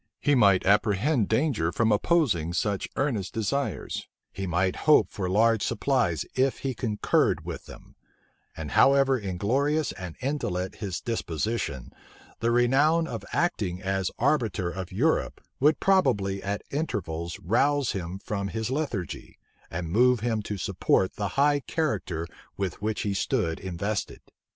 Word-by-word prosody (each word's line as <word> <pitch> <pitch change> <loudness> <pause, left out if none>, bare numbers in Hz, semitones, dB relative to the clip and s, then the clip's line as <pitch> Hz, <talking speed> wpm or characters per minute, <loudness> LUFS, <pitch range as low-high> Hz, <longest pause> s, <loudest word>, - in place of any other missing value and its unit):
He 145 - +2
might 100 -8 +4
apprehend 105 +5 +2
danger 110 - +1
from 110 +4 +1
opposing 105 - +2
such 100 +2 -1
earnest 120 -9 -1
desires: 110 - -2 0.3
he 95 0 -4
might 95 +2 0
hope 110 - +6
for 95 -3 -3
large 110 +3 +3
supplies 115 - 0
if 130 0 +1
he 135 - 0
concurred 110 -3 +1
with - - -6
them: - - -13 0.6
and 80 -2 -5
however 135 -1 +4
inglorious 130 - 0
and 90 -3 -8
indolent 95 -10 -2
his 100 -5 -4
disposition, 85 - -3 0.5
the 115 - +1
renown 135 +8 +3
of 115 -4 -5
acting 100 - 0
as 95 -1 0
arbiter 115 -10 +1
of 95 +1 -6
Europe 135 +13 +1 0.2
would 150 +3 +4
probably 100 - +2
at 100 +1 -3
intervals 85 - -3
rouse 135 - +2
him 90 -1 -4
from 100 0 -3
his 110 +3 -3
lethargy, 130 - -4 0.3
and 80 -1 -4
move 125 +3 +4
him 115 -2 0
to 105 0 -5
support 95 0 +1
the 105 - -2
high 145 +1 +4
character 110 - -2 0.3
with 95 -1 -3
which 110 +1 -1
he 105 -3 -1
stood 100 -5 -1
invested. 95 +3 -3
105 Hz, 140 wpm, -27 LUFS, 95-135 Hz, 0.6 s, hope